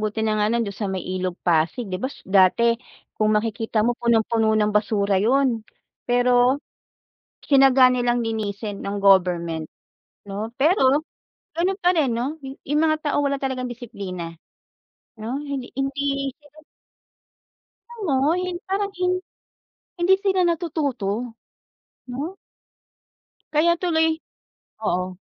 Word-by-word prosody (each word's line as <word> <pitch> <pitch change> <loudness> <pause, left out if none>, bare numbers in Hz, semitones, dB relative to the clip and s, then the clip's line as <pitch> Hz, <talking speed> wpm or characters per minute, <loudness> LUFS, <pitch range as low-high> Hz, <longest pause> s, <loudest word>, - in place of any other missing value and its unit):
buti 215 +1 -2
na 215 -1 +1
nga 210 - +3
lang, 235 -1 +1
do'n 200 - -6
sa 205 -1 -3
may 190 -1 -3
Ilog 185 -1 -3
Pasig, 170 +7 +1
‘di 185 - -2
ba, 260 - -1
s - - -15
dati, 195 +5 +4 0.4
kung 215 0 +2
makikita 220 0 0
mo 240 - +2
punong-puno 225 -2 +2
ng 210 0 +2
basura 205 -2 +2
'yon. 245 +1 +2 0.5
Pero, 245 +2 +4 0.9
tyinaga 270 -2 +6
nilang 245 -1 +1
linisin, 210 -2 -4
ng 200 +1 -3
government, 175 -5 +3 0.6
‘no? 205 +3 -4
Pero, 285 -1 +3 0.5
gano'n 370 +3 0
pa 360 0 +3
rin 290 -6 +2
‘no, 250 +7 -2
yu 270 0 -8
yung 300 +2 +2
mga 310 -1 +3
tao - - +1
wala 280 0 0
talagang 260 -2 -2
disiplina, 195 -8 -7 0.8
'no? 230 +5 -3
Hindi, 280 -4 -5
hindi 275 0 -1
sila 295 0 -22 1.4
Alam 435 -4 -6 0.2
mo, 290 +3 +3
hin 365 -1 -3
parang 400 +1 -1
hin 365 0 +2 0.9
hindi 350 +2 +5
sila 380 -2 +2
natututo, 305 - -1 1.0
‘no? 305 +10 -5 1.2
Kaya 325 +3 +4
tuloy 325 -3 +2 0.8
oo. 180 -1 -1
245 Hz, 130 wpm, -23 LUFS, 210-285 Hz, 1.4 s, tyinaga